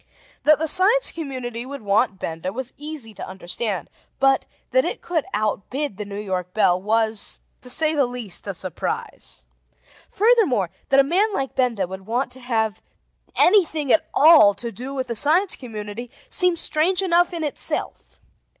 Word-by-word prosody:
That 305 0 +6
the 320 - -2
Science 400 +10 +5
Community 255 -7 -5
would 275 -1 -8
want 205 +1 +1
Benda 165 +1 -4
was 255 +4 -4
easy 290 -7 -7
to 195 - -8
understand; 190 +2 -4 0.3
but, 270 0 +3 0.2
that - - +4
it - - -4
could 330 -4 -1
outbid 215 +4 -2
the 210 - -5
New 200 0 -6
York 185 -3 -4
Bell, 180 -4 +3
was, 220 +1 0 0.2
to 250 - -10
say 310 +4 +1
the 280 -4 +2
least, 240 -6 -5
a 200 - -3
surprise. 170 - -5 0.7
Furthermore, 380 - +2 0.2
that 275 - +5
a - - +7
man 375 +10 +1
like 270 -1 -2
Benda 235 -7 0
would 190 +2 -9
want 245 +4 -1
to 260 - -10
have 220 -4 -1 0.5
anything 315 -9 +3
at - - +2
all 295 -10 +7
to 235 -1 -6
do 255 +4 -7
with 260 -1 -2
the 235 -2 -4
Science 340 - +3
Community 225 -1 -7 0.2
seemed 360 -2 +2
strange 350 +4 +1
enough 350 -1 +3
in 335 -2 -4
itself. 295 - -3
250 Hz, 165 wpm, -22 LUFS, 210-310 Hz, 0.7 s, a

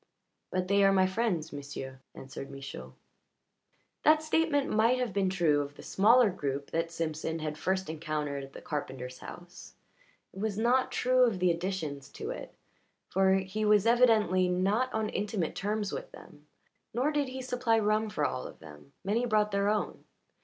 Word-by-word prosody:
"But 185 0 -1
they 200 +1 +4
are 195 - +6
my 190 -1 +4
friends, 185 -6 -1
m'sieu'," 140 -2 -7 0.2
answered 135 +1 -8
Michaud. 65 - -8 1.1
The 310 +1 +7
statement 310 -2 +1
might 225 +4 +3
have 250 -5 -2
been 195 -2 +1
true 165 -6 +2
of 145 0 -6
the - - -12
smaller 225 +2 +5
group 140 -5 -4
that 165 0 0
Simpson 160 -1 -3
had 155 -1 -4
first 190 +4 -1
encountered 150 -3 -3
at 135 0 -11
the - - -10
carpenter's 130 -4 -5
house; 175 0 -11 0.6
it - - -9
was 210 -1 -2
not 245 +3 +2
true 255 0 +2
of 220 -5 -1
the 180 -1 +3
additions 165 -6 -3
to - - -5
it, - - -7 0.6
for 190 0 +3
he 190 +3 -2
was 210 -1 +4
evidently 225 -6 +4
not 200 +8 +1
on 220 -1 -1
intimate 200 -5 -2
terms 210 0 -2
with - - -6
them. - - -15 0.5
Nor 265 +5 +2
did 295 -2 0
he 260 +1 -6
supply 250 -3 +1
rum 215 0 +1
for 150 -8 -1
all 130 - -2
of - - -12
them; 80 - -14
many 225 +6 0
brought 210 -2 +2
their 200 0 +1
own. 210 0 -1
190 Hz, 175 wpm, -30 LUFS, 155-220 Hz, 1.1 s, The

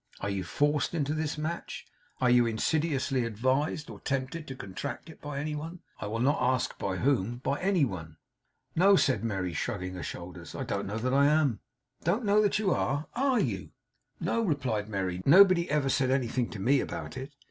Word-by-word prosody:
Are 100 - -2
you 95 -1 -2
forced 145 - 0
into 150 -2 0
this 155 -1 -2
match? 160 +3 -4 0.3
Are 125 - +3
you 120 -1 +5
insidiously 135 +2 0
advised 130 +7 0
or - - -9
tempted 140 +3 -3
to 135 - -6
contract 130 - -6
it, - - -17
by 145 -1 -5
any 150 +1 -2
one? 165 +4 -6 0.2
I 105 - -4
will 110 +2 -2
not 135 +6 +2
ask 125 0 +1
by 95 -2 -1
whom; 120 -3 +1
by 140 +2 -1
any 185 -5 +3
one?' 85 -8 -7 0.6
'No,' 195 +4 +6
said 130 -10 +2
Merry, 95 -6 -2
shrugging 90 -1 -3
her 90 - -6
shoulders. 85 -1 -7
'I - - -3
don't 100 0 -3
know 105 +2 -3
that 125 +3 -1
I 140 +1 +5
am.' 145 -7 +2 0.4
'Don't 205 +8 +1
know 205 +1 +4
that 205 -1 +2
you 210 -3 +1
are! 145 -1 0
Are 260 0 +2
you?' - - -2 0.5
'No,' 230 - 0
replied 130 - -1
Merry. 95 -3 -2
'Nobody 185 - +6
ever 145 -2 +1
said 130 -1 +2
anything 130 -2 0
to 105 - -7
me 130 +8 +3
about - - -5
it. 135 +2 -7
135 Hz, 195 wpm, -29 LUFS, 110-155 Hz, 0.6 s, No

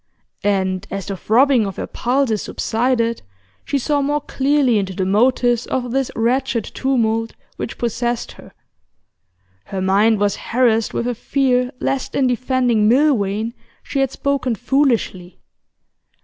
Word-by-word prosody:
And 190 -1 0
as 195 -1 -5
the 200 - -4
throbbing 235 +3 +3
of 195 - -6
her - - -4
pulses 245 -4 0
subsided, 230 0 -1 0.4
she 280 - -1
saw 285 +2 0
more 290 +1 0
clearly 270 -4 +2
into 190 -1 -3
the 190 - -1
motives 240 +3 +2
of 250 -2 -2
this 270 0 0
wretched 240 0 0
tumult 225 -4 -1 0.2
which - - -5
possessed 240 0 -2
her. - - -14 1.1
Her 195 - -5
mind 200 +3 +3
was 205 -1 +1
harassed 230 -2 +1
with 235 - -1
a 245 - 0
fear 250 +1 +1
lest 270 -1 -2
in 270 - +2
defending 245 -3 +2
Milvain 230 -5 +2 0.3
she 275 - -3
had 270 -1 +2
spoken 270 -3 -1
foolishly. 235 -8 0
240 Hz, 135 wpm, -19 LUFS, 215-265 Hz, 1.1 s, throbbing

